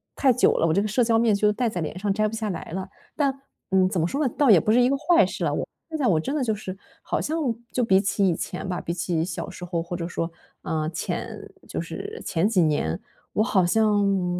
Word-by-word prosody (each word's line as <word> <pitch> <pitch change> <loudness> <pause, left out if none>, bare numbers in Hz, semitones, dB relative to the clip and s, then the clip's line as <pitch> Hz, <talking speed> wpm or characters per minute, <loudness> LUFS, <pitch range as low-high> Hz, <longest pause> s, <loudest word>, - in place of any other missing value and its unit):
太 270 - +4
久 250 - +4
了， 165 - +3
我 160 - +2
这 200 - +2
个 - - -1
社 235 +4 +2
交 225 -1 +3
面 225 -1 +3
具 200 - -1
就 210 0 +5
戴 235 +4 0
在 180 -6 -2
脸 155 +3 -4
上 200 +1 0
摘 215 +2 +1
不 220 - -5
下 220 -2 -2
来 175 - -5
了。 190 +1 -3 0.3
但 275 -2 0 0.3
嗯， 190 -1 +4
怎 190 -2 -1
么 165 - +2
说 280 +10 -2
呢？ 255 - 0
倒 280 -5 +5
也 190 - +8
不 215 - +1
是 235 - +5
一 245 - +5
个 275 - +2
坏 340 +3 +4
事 - - -4
了， - - +1
我 - - -2 0.2
现 320 - -3
在 280 -5 +1
我 170 -7 +3
真 270 - -3
的 290 - 0
就 225 -3 +1
是 190 -2 -6 0.3
好 - - -2
像 315 +2 -1 0.3
就 250 - 0
比 190 -4 +4
起 200 -1 +1
以 175 - +2
前 180 +3 -5
吧， 180 -1 -2
比 170 - -3
起 170 -2 -1
小 170 - -5
时 180 - -9
候 175 -1 -2
或 170 +1 -5
者 170 -1 -3
说， 170 -1 -3 0.3
啊， 155 -1 -2
前 170 +1 -4 0.3
就 - - -4
是 425 +2 -6
前 175 +2 +1
几 200 -5 +3
年， 145 - 0 0.3
我 215 - +2
好 200 -5 +3
像， 200 -3 +2
200 Hz, 290 characters per minute, -25 LUFS, 175-230 Hz, 0.3 s, 也